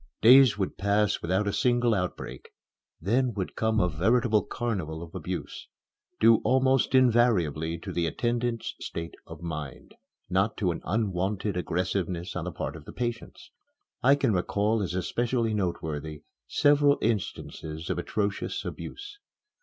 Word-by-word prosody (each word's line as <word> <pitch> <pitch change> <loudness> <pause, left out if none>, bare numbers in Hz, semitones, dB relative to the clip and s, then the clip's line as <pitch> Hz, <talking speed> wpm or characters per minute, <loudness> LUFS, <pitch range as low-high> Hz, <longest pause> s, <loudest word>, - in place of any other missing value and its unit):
Days 125 -1 +8
would 95 -2 -3
pass 100 +1 +1
without 95 +5 0
a 100 - 0
single 120 -2 +2
outbreak. 90 -3 -4 0.5
Then 120 +6 +1
would 95 -3 -4
come 110 0 +1
a 90 - +3
veritable 105 +7 +2
carnival 90 -9 -3
of 85 - -12
abuse - - -5 0.5
due 115 0 +7
almost 130 +1 +2
invariably 105 - +3
to 80 - -7
the 85 -1 0
attendants' 120 +5 -1
state 85 0 -5
of - - -10
mind, 75 -6 -6 0.3
not 95 +4 +1
to 90 -4 +1
an 85 - -5
unwonted 100 0 -1
aggressiveness 90 0 -2
on 90 -2 -3
the 90 - -3
part - - -5
of - - -11
the - - -10
patients. 120 -1 -5 0.5
I 135 +3 +6
can 135 -6 +1
recall 105 +4 +1
as 90 -2 -3
especially 115 +4 0
noteworthy 80 -6 -3 0.2
several 145 -1 +4
instances 85 -7 -3
of - - -2
atrocious 100 -1 -2
abuse. 410 0 -7
105 Hz, 140 wpm, -27 LUFS, 90-120 Hz, 0.5 s, Days